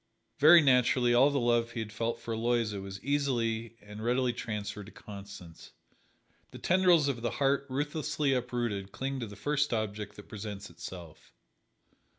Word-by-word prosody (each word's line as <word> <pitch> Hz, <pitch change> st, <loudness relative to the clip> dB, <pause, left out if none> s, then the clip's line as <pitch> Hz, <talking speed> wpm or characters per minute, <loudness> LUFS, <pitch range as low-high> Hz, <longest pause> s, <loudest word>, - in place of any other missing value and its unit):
Very 160 Hz, +3 st, +8 dB
naturally, 125 Hz, -2 st, +4 dB
all 130 Hz, +4 st, +6 dB
the 140 Hz, -1 st, 0 dB
love 120 Hz, -1 st, +2 dB
he -, -, -4 dB
had 110 Hz, -1 st, -5 dB
felt 115 Hz, +1 st, -2 dB
for 115 Hz, 0 st, -5 dB
Aloysia 115 Hz, -3 st, 0 dB
was 95 Hz, 0 st, -7 dB
easily 115 Hz, -5 st, -1 dB
and 105 Hz, +1 st, -9 dB
readily 125 Hz, +1 st, +1 dB
transferred 105 Hz, -3 st, -5 dB
to -, -, -11 dB
Constance. 100 Hz, -5 st, -11 dB, 0.8 s
The -, -, -11 dB
tendrils 175 Hz, -4 st, +4 dB
of 130 Hz, -4 st, -2 dB
the 120 Hz, -, 0 dB
heart 140 Hz, -1 st, +1 dB
ruthlessly 150 Hz, +1 st, -1 dB
uprooted 120 Hz, -6 st, -2 dB
cling 135 Hz, +3 st, -3 dB
to 115 Hz, -, -4 dB
the 100 Hz, -, -10 dB
first 145 Hz, +7 st, 0 dB
object 105 Hz, -2 st, -3 dB
that 105 Hz, -, -12 dB
presents 105 Hz, -1 st, -7 dB
itself. 85 Hz, -4 st, -10 dB
120 Hz, 160 wpm, -30 LUFS, 105-135 Hz, 0.8 s, Very